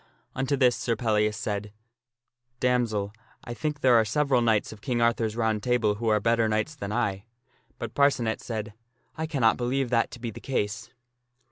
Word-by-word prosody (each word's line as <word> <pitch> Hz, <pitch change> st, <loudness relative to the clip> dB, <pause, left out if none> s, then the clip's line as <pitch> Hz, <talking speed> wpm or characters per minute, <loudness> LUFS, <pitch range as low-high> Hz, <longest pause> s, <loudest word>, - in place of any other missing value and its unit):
Unto 135 Hz, +1 st, -1 dB
this 125 Hz, -2 st, +4 dB
Sir 115 Hz, -, -1 dB
Pellias 105 Hz, -3 st, +1 dB
said, 105 Hz, 0 st, -3 dB, 0.4 s
" 120 Hz, 0 st, -52 dB
Damsel, 115 Hz, -5 st, 0 dB, 0.3 s
I 120 Hz, -, -6 dB
think 150 Hz, +3 st, -3 dB
there 130 Hz, -2 st, +5 dB
are 115 Hz, -1 st, +6 dB
several 130 Hz, +3 st, +1 dB
knights 110 Hz, -3 st, +2 dB
of 105 Hz, -1 st, -12 dB
King 120 Hz, +1 st, -1 dB
Arthur's 115 Hz, -2 st, +1 dB
Round 110 Hz, -2 st, 0 dB
Table 120 Hz, -3 st, +2 dB
who 115 Hz, -, -1 dB
are 105 Hz, -1 st, +4 dB
better 115 Hz, +1 st, +2 dB
knights 110 Hz, +8 st, 0 dB
than 115 Hz, -9 st, -6 dB
I." 105 Hz, -3 st, -1 dB, 0.5 s
But -, -, -6 dB
Parcenet 130 Hz, -6 st, +2 dB
said, 110 Hz, -2 st, -5 dB, 0.2 s
" 125 Hz, +1 st, -42 dB
I 160 Hz, -, -1 dB
cannot 130 Hz, -8 st, +2 dB
believe 125 Hz, +1 st, -1 dB
that 115 Hz, -1 st, +2 dB
to 120 Hz, -, -10 dB
be 120 Hz, -1 st, -4 dB
the -, -, -10 dB
case." 105 Hz, -5 st, -2 dB
115 Hz, 190 wpm, -27 LUFS, 110-125 Hz, 0.5 s, are